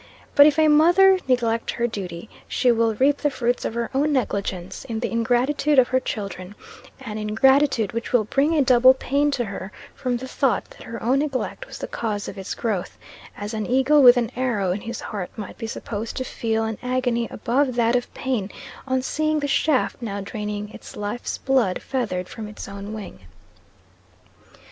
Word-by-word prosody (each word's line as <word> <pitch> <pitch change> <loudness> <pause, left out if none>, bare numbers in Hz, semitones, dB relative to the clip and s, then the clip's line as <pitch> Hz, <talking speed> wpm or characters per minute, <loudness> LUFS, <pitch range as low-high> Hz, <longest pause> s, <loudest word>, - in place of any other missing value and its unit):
But 285 +1 +8
if 300 0 +2
a 315 -1 +5
mother 350 +6 +6
neglect 230 -3 +1
her 235 - -1
duty, 190 -5 -5 0.2
she 250 - +2
will 225 -1 +2
reap 280 +5 +3
the 295 - 0
fruits 245 -2 -1
of 225 - -3
her 235 -1 -2
own 290 +3 +2
negligence 200 -8 -2
in 225 -2 -4
the 240 - -3
ingratitude 250 +6 +1
of 255 -2 +5
her 260 - +2
children 200 -5 -6 0.5
an 215 -4 -5
ingratitude 230 +1 +3
which 230 0 -4
will 245 -3 +4
bring 280 +9 +1
a 295 - +4
double 255 0 +6
pain 285 +2 +1
to 260 -4 -1
her, 200 -1 -7 0.2
from 250 -2 -2
the 260 +2 -7
thought 265 -1 0
that - - -15
her 230 0 -8
own 255 +4 +2
neglect 295 - -3
was - - -9
the - - -5
cause 210 -3 -3
of 195 - -7
its 190 - -5
growth, 210 -6 -3 0.4
as 205 +2 -5
an 215 -1 -3
eagle 265 +4 +4
with 245 -1 +8
an 235 -3 0
arrow 235 -8 0
in 195 +3 -2
his 235 0 -6
heart 200 -5 -5
might 210 -3 -7
be 225 - -4
supposed 225 0 -5
to 260 - -1
feel 225 -3 -2
an 220 -1 -3
agony 250 -2 0
above 255 +3 0
that 235 0 +2
of 245 - -1
pain 240 -7 -2 0.4
on 260 -1 0
seeing 310 +2 0
the 290 - -2
shaft 280 -2 +1
now 200 -4 -4
draining 210 +1 -5
its - - -11
life's 210 +4 -4
blood 260 -9 +1
feathered 205 -9 -3
from 215 +2 -7
its 210 - -8
own 200 +1 -7
wing. 215 -3 -8
240 Hz, 190 wpm, -23 LUFS, 210-265 Hz, 0.5 s, But